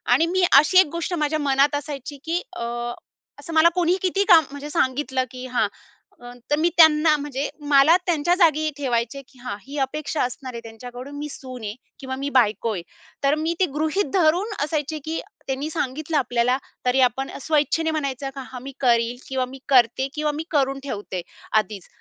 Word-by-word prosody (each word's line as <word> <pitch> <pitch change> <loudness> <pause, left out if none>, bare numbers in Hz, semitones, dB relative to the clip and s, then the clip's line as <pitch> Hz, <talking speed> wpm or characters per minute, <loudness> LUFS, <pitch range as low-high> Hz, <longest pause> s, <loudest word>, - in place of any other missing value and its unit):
आणि 325 - +3
मी 365 +2 +1 0.2
अशी 335 +6 +5
एक 375 - +6
गोष्ट 335 +1 -3
माझ्या 305 -2 0
मनात 280 0 +3
असायची 285 -1 -5
की 335 +2 0
अ, - - -4 0.8
असं 335 - -8
मला 320 +1 +6
कोणीही 355 0 +2
किती 380 +2 +1
काम 335 -5 +8
म्हणजे 285 +1 -7
सांगितलं 265 -4 0
की 255 0 -8
हां, 245 -4 +1 0.8
तर 295 - +5
मी 330 +3 +3
त्यांना 310 -1 +6
म्हणजे 285 -1 -3 0.2
मला 285 +3 +6
त्यांच्या 345 0 +2
जागी 310 -3 +4
ठेवायचे, 245 -1 -1
की 260 - -22
हां 245 -4 -5
ही 280 +2 -8
अपेक्षा 300 +2 -3
असणार 255 +1 -5
आहे 235 - -6
त्यांच्याकडून 245 +4 -9
मी 295 +1 -4
सून 255 -4 -9
आहे 210 0 -4 0.2
किंवा 260 -1 -5
मी 280 +1 -2
बायको 220 -1 +2
आहे. 180 -4 -5 0.4
तर 280 +2 +4
मी 325 +2 0
ते 375 - +4
गृहीत 310 +1 0
धरून 365 +4 +2
असायचे 305 0 -2
की 320 +1 -2 0.3
त्यांनी 270 +3 -2
सांगितलं 310 0 -2
आपल्याला 245 -1 +1 0.3
तरी 250 +1 +3
आपण 270 +4 -5
स्वइच्छेने 320 +2 +1
म्हणायचं 275 -3 -3
का 275 - -5
हा 255 - -6
मी 270 +3 -8
करीन 235 -2 +2
किंवा 260 -1 -1
मी 265 +2 -11
करते 255 0 +4
किंवा 300 -1 0
मी 320 - -2
करून 275 -3 +1
ठेवते 205 -8 -4 0.4
आधीच, 210 -3 -2
285 Hz, 185 wpm, -23 LUFS, 255-315 Hz, 0.8 s, काम